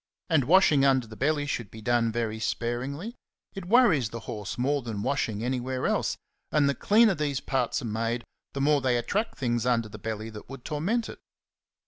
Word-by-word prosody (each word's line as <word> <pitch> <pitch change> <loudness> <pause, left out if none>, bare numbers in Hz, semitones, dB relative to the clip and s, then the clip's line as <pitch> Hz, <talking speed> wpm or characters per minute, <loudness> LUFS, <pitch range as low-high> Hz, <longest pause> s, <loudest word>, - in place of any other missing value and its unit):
And 150 -6 +4
washing 155 -3 +5
under 135 -3 +3
the 110 0 -11
belly 145 +4 0
should 115 -7 -3
be 110 - -11
done 115 0 +1
very 110 -1 -2
sparingly; 130 - -3 0.4
it 195 -2 -7
worries 190 - +4
the 115 +1 -7
horse 105 -5 -6
more 140 +3 +1
than 110 -4 -5
washing 115 -6 -1
anywhere 130 +1 -2
else, - - 0 0.3
and 145 -2 +3
the 140 - +2
cleaner 215 +6 +4
these 145 -5 -1
parts 130 -3 -1
are - - -4
made, 115 +2 -2 0.3
the 140 - -3
more 145 0 +3
they 125 -2 +2
attract 205 - -2
things 120 -3 0
under 120 -3 +1
the 105 - -10
belly 110 +1 -5
that 105 -1 -11
would 135 -2 -10
torment 190 +10 -1
it. - - -9
130 Hz, 190 wpm, -27 LUFS, 115-150 Hz, 0.4 s, washing